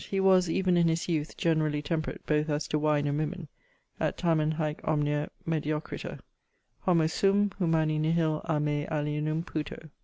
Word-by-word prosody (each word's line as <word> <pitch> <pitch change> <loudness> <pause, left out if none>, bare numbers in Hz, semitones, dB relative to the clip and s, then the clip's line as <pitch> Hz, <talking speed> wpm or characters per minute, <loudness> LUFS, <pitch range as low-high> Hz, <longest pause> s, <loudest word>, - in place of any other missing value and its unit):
_ - - -8
He 195 - -2
was, 185 -2 +4
even 180 +1 +2
in 170 -1 +4
his 165 0 0
youth, 155 -3 -2
(generally) 155 -3 +1
temperate, 155 +1 -3
both 150 0 +1
as 145 0 -1
to 150 - +1
wine 150 -1 +2
and 145 +1 0
women, 155 +1 -4 0.5
(et - - -1
tamen 155 -3 +2
haec 155 -1 -2
omnia 150 0 0 0.2
mediocriter) 155 -1 -3 0.6
Homo 170 -4 +3
sum, 200 +5 +2
humani 160 -3 +2
nihil 155 0 +1
a 155 -2 +1
me 150 0 -1
alienum 155 +1 -1
puto. 155 -1 -6
155 Hz, 165 wpm, -29 LUFS, 150-165 Hz, 0.6 s, was